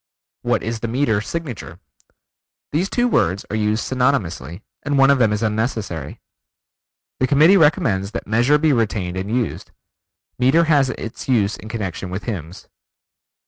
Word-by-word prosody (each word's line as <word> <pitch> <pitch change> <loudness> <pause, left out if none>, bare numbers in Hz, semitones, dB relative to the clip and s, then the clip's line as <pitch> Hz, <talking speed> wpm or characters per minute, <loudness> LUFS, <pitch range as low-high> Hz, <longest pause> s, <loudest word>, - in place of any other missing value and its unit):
"What - - 0
is 115 +1 -3
the 115 - -3
meter 115 -3 +1
signature?" 150 -2 -6 0.9
These 175 +7 0
two 245 0 +1
words 95 - +1
are - - -1
used 110 0 0
synonymously, 105 - -1 0.2
and 145 0 -1
one 135 0 +6
of 140 - +3
them 115 -4 +3
is 105 +1 -1
unnecessary. 110 - -2 1.0
The 130 - +2
Committee 155 +7 +6
recommends 115 - +2
that - - -4
Measure 120 +7 +3
be 155 -1 +2
retained 100 -6 -1
and 95 +2 -4
used. 120 0 -2 0.7
Meter 135 +7 +4
has 145 -5 +3
its 115 0 -7
use 105 -5 +2
in 110 - -11
connection 100 -4 -4
with 95 +2 -5
hymns. 90 -5 -6
115 Hz, 150 wpm, -20 LUFS, 100-140 Hz, 1.0 s, one